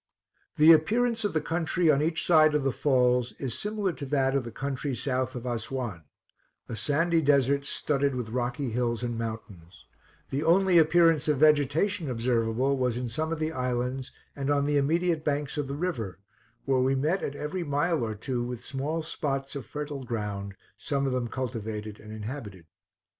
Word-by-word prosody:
The 155 Hz, +2 st, +8 dB
appearance 225 Hz, +9 st, +2 dB
of 205 Hz, -, -1 dB
the 155 Hz, -, +1 dB
country 165 Hz, 0 st, +2 dB
on 140 Hz, -1 st, +2 dB
each 160 Hz, +1 st, 0 dB
side 155 Hz, -3 st, +5 dB
of 150 Hz, -, +1 dB
the 135 Hz, -, +1 dB
falls 125 Hz, -3 st, +2 dB
is 130 Hz, -4 st, -4 dB
similar 210 Hz, -3 st, -2 dB
to 145 Hz, -, -7 dB
that 135 Hz, -1 st, +1 dB
of 140 Hz, -2 st, +1 dB
the 115 Hz, -, -6 dB
country 135 Hz, +2 st, -3 dB
south 130 Hz, +1 st, -1 dB
of 125 Hz, 0 st, -6 dB
Assuan 120 Hz, -7 st, -4 dB, 0.6 s
a -, -, -5 dB
sandy 165 Hz, +8 st, +1 dB
desert 140 Hz, -1 st, +3 dB
studded 140 Hz, -2 st, 0 dB
with 120 Hz, -3 st, -4 dB
rocky 125 Hz, +2 st, -2 dB
hills 120 Hz, 0 st, -1 dB
and 120 Hz, -1 st, -2 dB
mountains, 105 Hz, -6 st, -7 dB, 0.5 s
The 140 Hz, +3 st, -1 dB
only 180 Hz, +1 st, +5 dB
appearance 165 Hz, -1 st, +4 dB
of 150 Hz, -2 st, +2 dB
vegetation 155 Hz, +4 st, +3 dB
observable 120 Hz, +2 st, +1 dB
was 125 Hz, -2 st, 0 dB
in 125 Hz, -1 st, -3 dB
some 155 Hz, +7 st, -2 dB
of 165 Hz, -, -1 dB
the 155 Hz, +1 st, -1 dB
islands 125 Hz, 0 st, -2 dB, 0.2 s
and 140 Hz, 0 st, -3 dB
on 140 Hz, -1 st, +2 dB
the 145 Hz, 0 st, +2 dB
immediate 165 Hz, +3 st, +1 dB
banks 145 Hz, -1 st, -1 dB
of 145 Hz, -2 st, -2 dB
the 140 Hz, -, -4 dB
river, 145 Hz, -, -3 dB, 0.5 s
where 135 Hz, -2 st, +2 dB
we 135 Hz, +1 st, +2 dB
met 155 Hz, +8 st, +1 dB
at 140 Hz, -, -4 dB
every 150 Hz, +5 st, -3 dB
mile 150 Hz, 0 st, 0 dB
or 110 Hz, -1 st, -3 dB
two 125 Hz, +3 st, -3 dB
with 120 Hz, -1 st, -6 dB
small 145 Hz, +5 st, -2 dB
spots 140 Hz, -4 st, -3 dB
of 135 Hz, -6 st, -6 dB
fertile 145 Hz, -2 st, -5 dB
ground, 105 Hz, -4 st, -4 dB, 0.2 s
some 140 Hz, -1 st, -1 dB
of 135 Hz, -, 0 dB
them 125 Hz, -2 st, -1 dB
cultivated 110 Hz, -4 st, -5 dB
and 110 Hz, -, -11 dB
inhabited. 105 Hz, -, -7 dB
135 Hz, 180 wpm, -28 LUFS, 120-155 Hz, 0.6 s, The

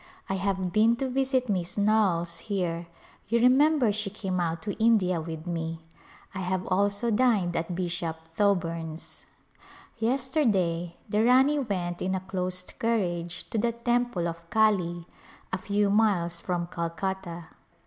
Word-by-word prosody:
I -, -, 0 dB
have 190 Hz, -1 st, -1 dB
been 225 Hz, +2 st, +4 dB
to 265 Hz, +3 st, -2 dB
visit 260 Hz, 0 st, 0 dB
Miss 185 Hz, -3 st, -1 dB
Knowles 200 Hz, -5 st, +2 dB
here; 175 Hz, -4 st, -2 dB, 0.4 s
you 235 Hz, +3 st, +2 dB
remember 260 Hz, 0 st, +4 dB
she 210 Hz, 0 st, -2 dB
came 190 Hz, -2 st, -3 dB
out 165 Hz, -1 st, -2 dB
to 205 Hz, -, -2 dB
India 185 Hz, -7 st, +3 dB
with 160 Hz, 0 st, -6 dB
me. 165 Hz, -2 st, -3 dB, 0.5 s
I 190 Hz, -, -5 dB
have 185 Hz, 0 st, -1 dB
also 200 Hz, +4 st, +1 dB
dined 210 Hz, -7 st, +2 dB
at 170 Hz, +2 st, -2 dB
Bishop 175 Hz, -2 st, -2 dB, 0.2 s
Thoburn's. 165 Hz, -5 st, -1 dB, 0.7 s
Yesterday 225 Hz, -, +1 dB
the 210 Hz, +1 st, +1 dB
Rani 265 Hz, +5 st, +5 dB
went 180 Hz, -8 st, -3 dB
in 190 Hz, +1 st, 0 dB
a -, -, -1 dB
closed 185 Hz, -1 st, -4 dB
carriage 175 Hz, -7 st, -1 dB
to 225 Hz, -, 0 dB
the 235 Hz, +2 st, +1 dB
temple 240 Hz, -6 st, 0 dB
of 170 Hz, 0 st, -7 dB
Kali, 180 Hz, -6 st, +2 dB, 0.5 s
a 185 Hz, -, 0 dB
few 200 Hz, +1 st, +1 dB
miles 180 Hz, -6 st, +2 dB
from 175 Hz, -2 st, -1 dB
Calcutta. 170 Hz, 0 st, -4 dB
190 Hz, 140 wpm, -27 LUFS, 175-220 Hz, 0.7 s, Rani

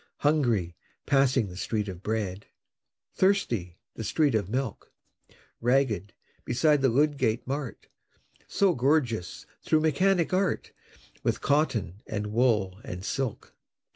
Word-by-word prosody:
Hungry 120 Hz, -, +1 dB, 0.3 s
passing 135 Hz, -4 st, +3 dB
the 90 Hz, -, -9 dB
Street 105 Hz, +3 st, -2 dB
of 90 Hz, -2 st, -7 dB
Bread; 105 Hz, -2 st, -3 dB, 0.7 s
Thirsty 120 Hz, -, +1 dB, 0.2 s
the 115 Hz, -, -6 dB
street 145 Hz, -, +2 dB
of 100 Hz, -4 st, 0 dB
Milk; 125 Hz, -1 st, -3 dB, 0.7 s
Ragged 120 Hz, -6 st, +1 dB, 0.3 s
beside 150 Hz, +3 st, +2 dB
the 135 Hz, -, +4 dB
Ludgate 130 Hz, -3 st, +1 dB
Mart, 135 Hz, -1 st, -4 dB, 0.6 s
So 195 Hz, -3 st, +2 dB
gorgeous, 125 Hz, -, 0 dB, 0.2 s
through 155 Hz, 0 st, +2 dB
Mechanic 175 Hz, +3 st, +2 dB
Art, 190 Hz, 0 st, 0 dB, 0.5 s
With -, -, -1 dB
cotton, 115 Hz, -, 0 dB
and 105 Hz, -1 st, -4 dB
wool, 105 Hz, -6 st, +2 dB
and 90 Hz, +1 st, -7 dB
silk! 135 Hz, -5 st, -3 dB
120 Hz, 115 wpm, -27 LUFS, 105-145 Hz, 0.7 s, the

